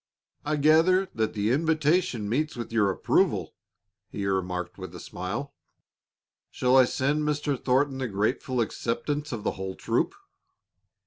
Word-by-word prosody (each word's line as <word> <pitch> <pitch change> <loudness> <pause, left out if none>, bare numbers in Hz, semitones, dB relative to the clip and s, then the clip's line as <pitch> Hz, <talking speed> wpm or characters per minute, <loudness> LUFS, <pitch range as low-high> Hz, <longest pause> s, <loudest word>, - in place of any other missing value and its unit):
"I 150 +1 0
gather 165 +6 +4
that 110 -1 -1
the 105 +2 +1
invitation 155 - +1
meets 150 +8 -1
with 120 -1 -6
your 105 -3 +3
approval," 95 - +1 0.6
he 100 - -4
remarked 90 -1 -2
with 95 -2 -8
a - - -7
smile. 120 +11 -5 1.0
"Shall 125 +1 +2
I 130 -1 +8
send 140 +4 0
Mr. 150 -1 0
Thornton 135 +1 +2
the 130 - -1
grateful 115 +5 -1
acceptance 145 +6 -2
of 115 -4 -4
the - - 0
whole 95 0 -5
troop?" - - 0
125 Hz, 140 wpm, -27 LUFS, 105-150 Hz, 1.0 s, I